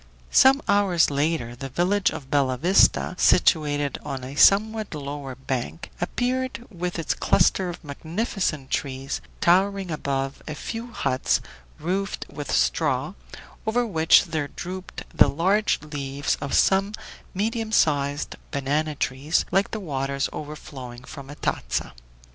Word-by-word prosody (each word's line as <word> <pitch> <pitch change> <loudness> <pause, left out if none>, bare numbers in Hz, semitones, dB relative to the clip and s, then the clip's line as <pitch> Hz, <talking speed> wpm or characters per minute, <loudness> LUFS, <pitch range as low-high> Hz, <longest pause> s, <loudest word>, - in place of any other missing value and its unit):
Some 270 +2 +6
hours 195 -6 +3
later 140 -4 -1
the 135 +2 -7
village 185 +8 +2
of 135 -2 -8
Bella 135 -3 +2
Vista, 180 +6 +4
situated 145 -5 +3
on 130 -2 -5
a 130 +2 -7
somewhat 210 +5 +4
lower 140 -2 -6
bank, 130 +4 -4
appeared, 250 +5 -2
with 180 -2 -4
its 165 - -1
cluster 185 -2 +2
of 175 0 -8
magnificent 160 - -3
trees, 135 0 -3 0.2
towering 190 +1 +3
above 135 -3 -2
a 155 - -4
few 230 +8 -6
huts 130 - +1 0.4
roofed 190 +5 -2
with - - -6
straw, - - +1 0.5
over 240 +2 +2
which 160 -7 +5
there 160 -4 -2
drooped 185 +5 -7
the - - +6
large 195 +7 +2
leaves 140 -2 -2
of 140 - -2
some 195 +2 +3 0.4
medium 220 +2 -1
sized 145 -6 +1
banana 145 +2 -1
trees, 140 +4 0
like 195 +1 +2
the 220 - -4
waters 140 -6 -2
overflowing 135 -5 -8
from 140 0 -10
a 145 - -8
tazza. - - -2
155 Hz, 130 wpm, -24 LUFS, 140-195 Hz, 0.5 s, Some